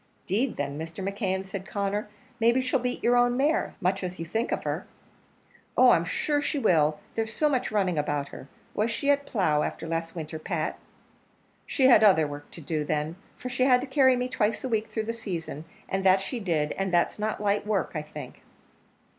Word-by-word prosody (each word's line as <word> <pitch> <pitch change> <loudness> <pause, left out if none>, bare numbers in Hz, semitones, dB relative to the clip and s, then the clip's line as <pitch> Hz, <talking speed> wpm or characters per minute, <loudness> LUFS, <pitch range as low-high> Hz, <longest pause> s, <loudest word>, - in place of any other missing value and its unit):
"'Deed, 230 +8 0
then, 145 +1 -3
Mr. 165 +4 -5
McKeon," 195 -2 -2
said 190 0 -6
Conner, 205 +1 -2 0.3
"maybe 235 +2 +4
she'll 255 +1 +1
beat 250 0 -3
your 240 +1 +4
own 245 0 +3
mare, 300 +5 +1
much 190 -1 0
as 180 0 -4
you 165 - -5
think 225 +8 -2
of - - -1
her." - - -3 0.9
"Oh! - - +8
I'm - - +3
sure 295 -1 0
she 290 - -1
will; 155 - +3
there's 225 0 -2
so 300 +7 +1
much 260 -6 0
running 190 -6 +1
about 145 -1 -1
her. - - -10 0.3
Was 215 +2 +1
she 280 +5 +1
at 285 0 0
plough 160 - +2
after - - -3
last 165 +1 -3
winter, 160 -1 -5
Pat?" - - -3 0.9
"She 265 - +2
had 240 -4 +7
other 185 -7 +6
work 145 0 -7
to 170 - -10
do, 155 0 -2
then, 150 +2 -2 0.2
for 250 - -6
she 255 0 +1
had 250 -2 +5
to - - -3
carry 265 -1 +4
me 250 0 -1
twice 220 -3 0
a 260 - -2
week 220 -1 0
through 220 - -3
the 230 - -2
season; 170 -8 -5 0.2
and 195 0 -1
that 190 0 +5
she 235 +6 -3
did 160 -7 0
and 195 -1 0
that's 175 +4 +2
not 215 +1 -1
light 205 0 0
work, 200 -5 0
I 155 - -2
think." 150 - -10
200 Hz, 210 wpm, -27 LUFS, 165-245 Hz, 0.9 s, Oh